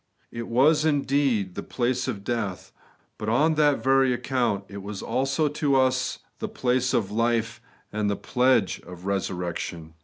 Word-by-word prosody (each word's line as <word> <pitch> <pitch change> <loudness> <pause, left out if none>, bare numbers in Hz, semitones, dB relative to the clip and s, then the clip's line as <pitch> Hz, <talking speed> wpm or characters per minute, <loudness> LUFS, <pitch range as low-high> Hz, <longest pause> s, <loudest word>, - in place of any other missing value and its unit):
It 115 0 -5
was, 150 +6 +4
indeed, 140 - +1
the - - -4
place 125 +1 -1
of 105 -6 -4
death; 105 -5 -3 0.5
but 105 - -3
on 150 +8 +3
that 150 -2 +2
very 135 -1 +4
account 120 -5 -1
it 100 0 -8
was 100 0 -6
also 135 +5 0
to 145 -1 0
us 130 -1 +2 0.2
the - - -3
place 125 0 0
of 100 -3 0
life 115 +1 0 0.3
and 105 -1 0
the 100 - 0
pledge 125 -5 +2
of 90 0 -12
resurrection. 90 -4 -3
120 Hz, 155 wpm, -25 LUFS, 100-135 Hz, 0.5 s, was